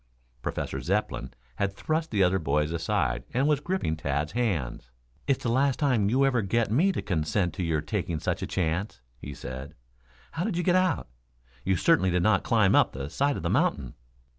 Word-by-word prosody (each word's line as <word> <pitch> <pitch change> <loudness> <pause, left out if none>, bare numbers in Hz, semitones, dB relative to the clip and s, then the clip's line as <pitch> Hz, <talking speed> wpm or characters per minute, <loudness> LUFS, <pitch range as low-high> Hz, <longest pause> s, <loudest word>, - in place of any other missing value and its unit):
Professor - - -3
Zepplin 65 +1 -1 0.3
had 100 -1 -1
thrust 160 +7 -1
the 100 -4 +2
other 95 +1 +3
boys 75 +1 0
aside 80 -6 -1
and 135 +3 +3
was 150 -2 +3
gripping 170 - -1
Tad's 75 0 -2
hands. 85 - -2 0.4
"It's 135 - +1
the 115 - 0
last 135 +2 +2
time 125 -9 +2
you 135 +4 +3
ever 125 -4 +2
get 105 +2 0
me 170 - +3
to - - -3
consent 90 0 0
to 90 - -3
your 80 -3 0
taking 85 -1 -2
such - - -2
a - - -3
chance," 90 - -2 0.2
he 70 +2 -7
said. 65 +5 -7 0.6
"How 165 - -2
did 190 -3 -2
you 175 - 0
get 180 0 +3
out? 185 - +1 0.6
You 95 0 +1
certainly 150 - +3
did 90 0 +1
not 110 -1 +3
climb 110 -4 +3
up - - +4
the 70 +2 -6
side 140 - +1
of - - -6
the - - 0
mountain." 65 -3 +1
95 Hz, 195 wpm, -27 LUFS, -, 0.6 s, up